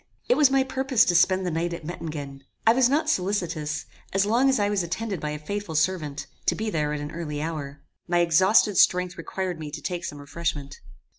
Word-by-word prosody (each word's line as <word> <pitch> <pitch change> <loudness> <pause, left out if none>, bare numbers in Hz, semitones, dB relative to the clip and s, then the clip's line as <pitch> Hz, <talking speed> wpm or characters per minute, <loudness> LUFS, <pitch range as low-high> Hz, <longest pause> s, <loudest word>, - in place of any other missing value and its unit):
It - - +4
was 295 -3 +5
my 270 0 +3
purpose 265 -2 +2
to 175 - +2
spend 185 +2 +3
the 180 - -1
night 170 +2 -1
at 165 -2 -7
Mettingen. 150 -5 -6 0.2
I 225 - +7
was 250 0 +4
not 295 +4 +1
solicitous, 170 -6 -1 0.3
as 195 +1 +3
long 240 +6 +3
as 265 - +3
I 205 - +2
was 205 -1 +1
attended 190 +3 -3
by 150 - -3
a 150 - -3
faithful 175 +2 -5
servant, 155 -3 0 0.2
to - - +3
be 220 0 -3
there 150 -4 0
at 150 -1 -3
an 145 +1 -5
early 155 -3 -5
hour. 150 -3 -5 0.2
My 175 0 +1
exhausted 185 +4 +4
strength 180 0 +3
required 180 0 -4
me 155 -1 -6
to 145 - -6
take 175 -2 -3
some 145 - -5
refreshment. 145 -1 -4
175 Hz, 215 wpm, -25 LUFS, 150-205 Hz, 0.3 s, I